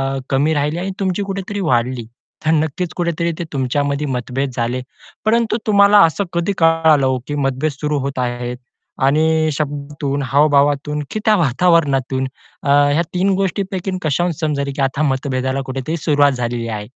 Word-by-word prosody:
अ, - - -2
कमी 145 +4 +2
राहिली 150 +2 0
आणि 190 +2 -3
तुमची 190 +1 -1
कुठेतरी 195 +1 -4
वाढली. 120 0 0 0.4
तर 160 - +3
नक्कीच 160 +2 -1
कुठेतरी 170 -1 -1
ते - - -1
तुमच्यामध्ये 140 +2 -1
मतभेद 130 +1 -2
झाले, 120 +2 -1 0.4
परंतु 225 0 +2
तुम्हाला 200 0 +6
असं 165 +5 -2
कधी 170 +3 0
कळालं 165 -3 +4
हो, 130 -1 +1
की 145 - -3
मतभेद 135 +3 0
सुरू 150 +1 -2
होत 135 0 -3
आहेत 120 0 -3 0.5
आणि 155 +2 +3
शब्दातून, 145 -1 -3
हाव-भावातून 145 +2 +2
की 215 - -2
त्या 215 -1 +5
वातावरणातून 140 -4 +2 0.4
अ, 140 - -2 0.2
ह्या 160 - +2
3 185 +2 +1
गोष्टींपैकी 190 0 -2
कशाहून 170 +4 0
समजेल, 140 -3 -1
की 140 - -2
आता 135 +2 0
मतभेदाला 130 0 -1
कुठेतरी 135 +5 -3
सुरुवात 145 -2 +3
झालेली 120 -2 -3
आहे. 105 -2 -5
145 Hz, 155 wpm, -18 LUFS, 135-170 Hz, 0.5 s, तुम्हाला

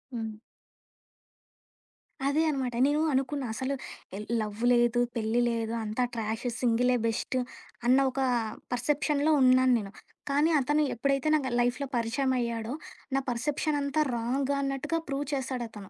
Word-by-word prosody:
హ్మ్. 225 -1 -3 2.0
అదే 285 +3 +2
అన్నమాట. 265 -4 -1
నేను 295 +2 +2
అనుకున్నా 270 +1 0
అసలు 260 +4 -2 0.4
ఎ - - -5 0.2
లవ్వు 215 +2 -3
లేదు. 240 0 +3 0.2
పెళ్లి 225 +1 0
లేదు. 230 -1 -2
అంతా 220 +3 -1
ట్రాషు. 225 +2 -2
సింగిలే 250 +1 +3
బెస్టు 230 +3 -1 0.5
అన్న 250 +2 +5
ఒక 270 - -4 0.5
పర్సెప్షన్‌లో 295 +4 +1
ఉన్నాను 255 0 +5
నేను. 195 -2 -7 0.4
కానీ 290 +3 +3
అతను 295 +3 +2
ఎప్పుడైతే 275 +3 0
నాకు 275 -4 0
లైఫ్‌లో 245 +3 +1
పరిచయం 245 +3 0
అయ్యాడో 235 0 -2 0.4
నా - - +4
పర్సెప్షన్ 295 +5 -1
అంతా 280 +2 0
రాంగన్నట్టుగా 275 +5 -1
ప్రూవ్ 280 0 -2
చేసాడతను. 240 -6 -4
255 Hz, 125 wpm, -29 LUFS, 230-280 Hz, 2.0 s, అన్న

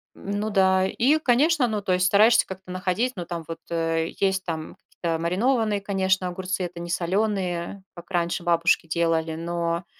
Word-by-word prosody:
Ну 205 +2 -3
да. 190 -2 +3
И, 275 +10 +2
конечно, 280 +1 +3
ну 210 -2 -2
то 185 -2 0
есть 180 0 +3
стараешься 215 +4 +5
как-то 190 0 -10
находить, 185 +7 -1
ну 175 -3 -5
там 170 -2 -5
вот, 165 - -6
э, 165 -1 0
есть 190 -1 +1
там 160 -2 -5
какие-то 165 -2 -4
маринованные, 210 +4 +1
конечно, 190 -2 0
огурцы, 185 +1 -3
это 175 -1 -6
не 175 - -6
соленые, 185 0 -1
как 175 +2 -12
раньше 175 -1 -1
бабушки 170 -1 +2
делали, 165 -1 0
но, 170 +1 -2
185 Hz, 170 wpm, -24 LUFS, 170-200 Hz, -, стараешься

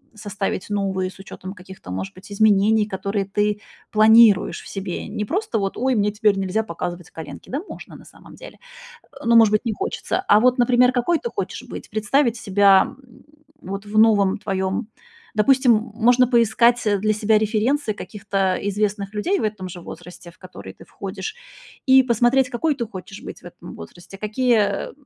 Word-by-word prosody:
составить 205 -2 -4
новые, 190 -2 -1
с - - -19
учётом 190 0 -9
каких-то, 190 - -12
может 95 +1 -5
быть, 185 +2 -15
изменений, 210 +1 +3
которые 195 0 -3
ты 205 +1 -1 0.3
планируешь 220 -1 +5
в - - -12
себе. 190 -3 -5
Не 210 - -4
просто 340 - -2
вот: 195 -1 -3
"Ой, 260 +2 +1
мне 210 -1 +1
теперь 210 -1 +1
нельзя 195 +3 -1
показывать 175 -2 -6
коленки". 160 - -10
Да 275 +4 -2
можно, - - -10
на - - -14
самом - - -16
деле, - - -13 0.7
но, 235 - +3
может 225 -2 +7
быть, 215 - +1
не 230 - -1
хочется. - - -3
А 205 - +6
вот, 250 +3 +3
например, 250 +1 +4
какой 265 +7 +1
ты 475 - -5
хочешь - - -5
быть? - - -9
Представить 230 +4 +1
себя 200 -3 +3 0.7
вот 195 -1 -7
в 210 +1 -1
новом 210 -3 +4
твоем 190 +2 -2 0.5
допустим, 250 +3 +4 0.2
можно 245 +3 +4
поискать, 235 0 +3
э, 205 -1 +2
для 215 +2 +1
себя 215 0 +2
референсы 220 +3 0
каких-то 205 -1 -8 0.3
известных 205 0 -2
людей 360 - 0
в - - -2
этом 210 -3 -4
же 180 0 -9
возрасте, 175 0 -11
в - - -28
который 180 - -11
ты - - -15
входишь, 190 - -7 0.5
и 265 0 +7
посмотреть, 250 +2 +2
какой 295 +5 0
ты 250 -4 -3
хочешь 195 -2 -10
быть - - -9
в - - -25
этом - - -11
возрасте, 175 - -12
какие, 230 +3 +1 0.3
э, - - -15
210 Hz, 175 wpm, -21 LUFS, 195-235 Hz, 0.7 s, может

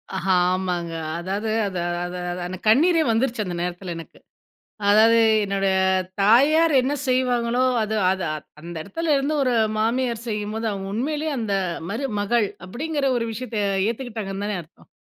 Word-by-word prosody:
ஆஹா 190 0 +1 0.2
ஆமாங்க 180 -2 -2 0.3
அதாவது 195 +5 -3 0.2
அது 185 -2 -4 0.2
அது 175 0 -5 0.3
அந்த 185 +1 -5
கண்ணீரே 325 +10 +5
வந்துருச்சு 230 -1 0
அந்த 180 -1 -4
நேரத்தில 180 0 -4
எனக்கு. 165 - -11 0.7
அதாவது 220 +3 +6 0.3
என்னுடைய 195 -1 0 0.5
தாயார் 285 +10 +5
என்ன 265 +3 -1
செய்வாங்களோ, 250 -1 +1 0.2
அது 215 0 -1 0.2
அது 190 0 -2 0.4
அந்த 170 +2 -8
இடத்துல 315 - -1
இருந்து 280 +3 -1
ஒரு 255 -2 +1 0.3
மாமியார் 235 +1 0
செய்யும்போது 215 +1 -3
அவங்க 195 -1 -5
உண்மையிலேயே 300 +6 -1
அந்த 215 -3 -2 0.4
மருமகள் 220 -2 0 0.2
அப்படிங்கிற 285 +8 -3
ஒரு 230 -1 -2
விஷயத்த 230 0 -5 0.3
ஏத்துக்கிட்டாங்கன்னு 220 -5 -4
தானே 210 -2 -2
அர்த்தம். 165 0 -21
220 Hz, 135 wpm, -23 LUFS, 195-255 Hz, 0.7 s, அதாவது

